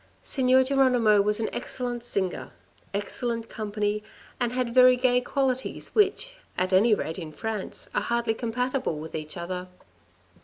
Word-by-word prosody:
Signor 260 -1 +4
Geronimo 250 -6 +4
was 210 +2 +2
an 225 - 0
excellent 245 -2 -4
singer, 190 - -2 0.4
excellent 230 +3 -3
company, 210 -1 -2 0.4
and 240 -2 0
had 250 -2 -1
very 255 0 +7
gay 250 0 +3
qualities 260 0 -2
which, 435 +4 +1 0.2
at 185 +1 0
any 210 +4 +5
rate 160 -2 -4
in 160 -3 -7
France, 215 +3 -5
are - - +1
hardly 235 -1 0
compatible 250 - -2
with 160 +1 -8
each 155 +2 -6
other. 180 +1 -4
235 Hz, 145 wpm, -26 LUFS, 200-255 Hz, 0.4 s, very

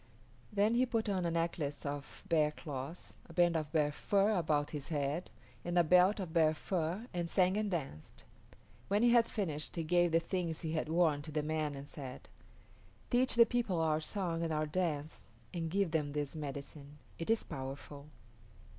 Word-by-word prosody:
Then 210 +2 +3
he 250 +2 +3
put 225 -2 0
on 185 -3 0
a - - +1
necklace 165 -4 -2
of 145 0 -5
bear 155 -3 +3
claws, 150 +1 -7 0.2
a - - -10
band 175 0 +4
of 155 -2 -2
bear 150 -2 +2
fur 200 +7 +2
about 155 -7 +1
his 145 -2 -5
head, 150 +2 -2 0.3
and 175 0 -1
a 175 - +7
belt 180 +5 +5
of 180 -4 -5
bear 160 -2 +4
fur, 175 +5 -2
and 175 -1 -2
sang 185 +1 +3
and 210 0 0
danced. 135 - -5 0.6
When 205 +3 +2
he 240 - +6
had 235 -1 +5
finished 160 -8 -3
he 165 - -1
gave 175 +1 +3
the 165 - +4
things 170 -1 -3
he 160 - -3
had 155 -1 -1
worn 160 -3 +3
to 155 - -8
the 150 0 -1
man 155 -1 -1
and 140 +1 -8
said, 135 -5 -8 0.8
"Teach 250 +1 +3
the 235 -1 +8
people 235 -8 0
our 155 -1 +2
song 170 0 -2
and 165 -1 -1
our 155 0 +1
dance, 155 -2 -2 0.3
and 165 -2 -2
give 195 -1 +1
them 150 -3 0
this 145 0 -3
medicine. 145 0 -7 0.2
It 165 - -4
is 225 0 +3
powerful." 140 0 -7
165 Hz, 190 wpm, -34 LUFS, 150-185 Hz, 0.8 s, the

